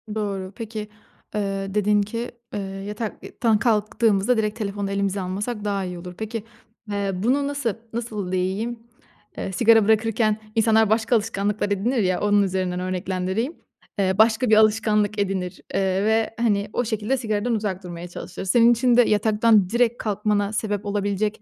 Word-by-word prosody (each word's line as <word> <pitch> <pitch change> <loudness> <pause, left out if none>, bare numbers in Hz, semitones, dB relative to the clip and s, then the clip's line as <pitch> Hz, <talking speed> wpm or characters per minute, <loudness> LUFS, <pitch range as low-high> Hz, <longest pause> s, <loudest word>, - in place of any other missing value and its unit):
Doğru. 195 -3 -3
Peki, 220 -2 -6 0.5
eee, 195 -1 -2
dedin 210 0 +3
ki, 230 +4 -4 0.2
eee, - - -2
yatak 200 +3 -6
i - - -9
tan 225 -3 +4
kalktığımızda 220 0 +2
direkt 215 0 -1
telefonu 200 -1 -3
elimize 200 0 -1
almasak 205 +4 -4
daha 200 -2 -1
iyi 180 -1 -6
olur. 180 +1 -9
Peki, 220 0 -4 0.5
eee, 200 -1 -1
bunu, 255 +9 +1
nasıl 280 -6 -1 0.2
nasıl 215 -5 -4
diyeyim? 195 +6 -1 0.6
Eee, - - -4
sigara 225 +2 +5
bırakırken 220 0 +2 0.2
insanlar 220 -1 +4
başka 220 +2 +2
alışkanlıklar 210 -2 0
edinir 215 +6 0
ya, 185 -1 0
onun 205 0 +4
üzerinden 185 -2 -1
örneklendireyim. 185 - -2 0.5
Eee, 190 -1 +2
başka 220 +2 +4
bir 220 - +6
alışkanlık 215 -1 +3
edinir, 190 -3 -2
eee 190 0 +1
ve 220 +1 +1
hani, 210 -3 +1
o 245 - 0
şekilde 220 +4 -1
sigaradan 225 0 -1
uzak 200 -3 -3
durmaya 175 -1 -7
çalışır. 175 +1 -7
Senin 230 +5 +5
için 240 +1 +3
de - - +9
yataktan 215 -2 +3
direkt 235 +1 +2
kalkmana 210 -1 0
sebep 210 -1 -2
olabilecek, 205 +1 -1
210 Hz, 155 wpm, -23 LUFS, 195-225 Hz, 0.6 s, de